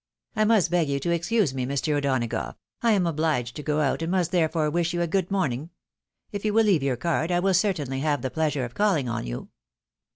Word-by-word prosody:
I 215 -1 +3
must 210 -6 +3
beg 170 -4 +2
you 140 0 0
to 170 - -1
excuse 170 - +1
me, 130 -1 -2
Mr. 140 +3 -1
O'Donagough, 130 -5 -1 0.3
I 230 -1 +3
am 195 -3 +2
obUged 155 -7 0
to 150 - -6
go 150 +1 0
out, 140 +2 0
and 165 - -2
must 180 -2 +1
therefore 160 -3 +1
wish 170 +1 0
you 175 - 0
a - - -1
good 185 +1 0
morning. 155 -6 -1 0.6
If 205 -1 -5
you 210 -1 0
will 225 0 +5
leave 190 -8 +3
your 135 -2 0
card, 170 +3 -1
I 175 - +2
will 190 +1 +2
certainly 170 -9 0
have 145 0 0
the 130 - -2
pleasure 150 -5 0
of 120 - -9
calling 175 -7 +1
on 115 - -3
you." - - -6
160 Hz, 230 wpm, -25 LUFS, 140-180 Hz, 0.6 s, will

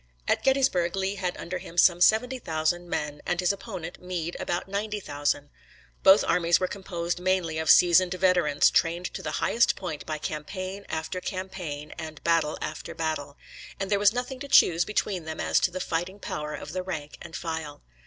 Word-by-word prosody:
At - - +2
Gettysburg 260 -11 +2
Lee 195 0 -1
had 180 -2 -2
under 180 +2 -4
him 175 -1 -11
some 175 0 +5
seventy 250 +7 +4
thousand 165 -1 -1
men, 150 -2 -3
and 175 - -1
his 180 +1 +2
opponent, 185 -5 -7
Meade, 175 -2 -4
about 175 - -2
ninety 210 +2 -2
thousand. 145 -4 -2 0.5
Both 195 +2 +7
armies 170 -1 +3
were 185 - 0
composed 175 -3 -4
mainly 180 -3 0
of 160 - -2
seasoned 180 +1 +6
veterans, 180 -5 +3
trained 170 +2 +1
to - - -5
the - - -4
highest 235 +2 +3
point 170 -6 -6
by 155 - -2
campaign 185 +6 -5
after 160 +3 -3
campaign 180 -7 -5
and 155 -2 -7
battle 165 -2 +2
after 150 - -6
battle; 155 -3 -3 0.4
and 195 0 -3
there 200 - +3
was 205 0 +5
nothing 250 +2 -4
to 280 - -6
choose 175 -9 +5
between 195 -5 -1
them 160 0 -6
as - - +2
to - - +2
the 185 +1 -5
fighting 180 +3 -3
power 150 -5 -4
of 145 - -8
the 185 - -2
rank 160 -6 -6
and 165 - -9
file. 160 -3 -5
175 Hz, 185 wpm, -27 LUFS, 160-190 Hz, 0.5 s, Both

